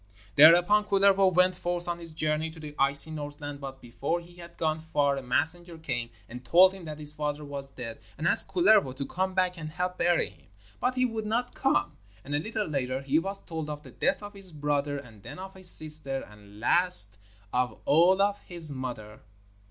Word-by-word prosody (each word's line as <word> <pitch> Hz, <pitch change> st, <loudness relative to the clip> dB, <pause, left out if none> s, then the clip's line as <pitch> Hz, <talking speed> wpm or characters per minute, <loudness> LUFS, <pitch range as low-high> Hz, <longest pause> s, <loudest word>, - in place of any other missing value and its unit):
Thereupon 175 Hz, +7 st, +6 dB
Kullervo 195 Hz, -1 st, +3 dB
went 180 Hz, +1 st, +2 dB
forth 175 Hz, -1 st, -2 dB
on 175 Hz, 0 st, -4 dB
his 170 Hz, -1 st, -3 dB
journey 155 Hz, 0 st, -2 dB
to 160 Hz, 0 st, -14 dB
the 150 Hz, -1 st, -9 dB
icy 140 Hz, +3 st, +4 dB
Northland, 145 Hz, -1 st, -8 dB
but 135 Hz, -1 st, -8 dB
before 135 Hz, +7 st, -4 dB
he 175 Hz, +1 st, -17 dB
had 170 Hz, -1 st, -13 dB
gone 155 Hz, -1 st, -1 dB
far 145 Hz, -3 st, -1 dB
a 135 Hz, -, -5 dB
messenger 165 Hz, +7 st, -2 dB
came 125 Hz, -7 st, -5 dB, 0.2 s
and 125 Hz, +2 st, -10 dB
told 180 Hz, +9 st, +5 dB
him 190 Hz, -3 st, -12 dB
that 155 Hz, -1 st, -8 dB
his 150 Hz, -1 st, +1 dB
father 150 Hz, -1 st, -4 dB
was 140 Hz, -1 st, -8 dB
dead 120 Hz, -4 st, -8 dB, 0.2 s
and 155 Hz, -, -2 dB
asked -, -, +3 dB
Kullervo 180 Hz, -7 st, +3 dB
to 140 Hz, -, -5 dB
come 185 Hz, +4 st, -3 dB
back 185 Hz, -2 st, 0 dB
and 155 Hz, -1 st, -7 dB
help 180 Hz, +3 st, -5 dB
bury 175 Hz, -10 st, +1 dB
him, 90 Hz, -, -25 dB, 0.3 s
but 250 Hz, +1 st, -1 dB
he 255 Hz, 0 st, +1 dB
would 225 Hz, -3 st, -4 dB
not 240 Hz, +3 st, -2 dB
come. 270 Hz, +2 st, -1 dB, 0.3 s
And 145 Hz, -, -7 dB
a 145 Hz, -, +1 dB
little 215 Hz, +5 st, -4 dB
later 135 Hz, -4 st, -3 dB
he 140 Hz, +3 st, +1 dB
was 195 Hz, +3 st, -6 dB
told 160 Hz, -2 st, -6 dB
of 150 Hz, 0 st, -7 dB
the -, -, -14 dB
death -, -, -2 dB
of 205 Hz, 0 st, -9 dB
his 195 Hz, -3 st, -7 dB
brother 145 Hz, -1 st, -2 dB
and 115 Hz, -7 st, -13 dB
then -, -, -11 dB
of 190 Hz, +1 st, -9 dB
his 185 Hz, -2 st, +2 dB
sister, 150 Hz, -5 st, 0 dB
and 105 Hz, -1 st, -17 dB
last 110 Hz, -, +8 dB, 0.3 s
of 125 Hz, 0 st, -2 dB
all 175 Hz, +6 st, +4 dB
of 205 Hz, 0 st, -1 dB
his 170 Hz, -4 st, -3 dB
mother. 120 Hz, -6 st, -7 dB
155 Hz, 205 wpm, -27 LUFS, 140-180 Hz, 0.3 s, last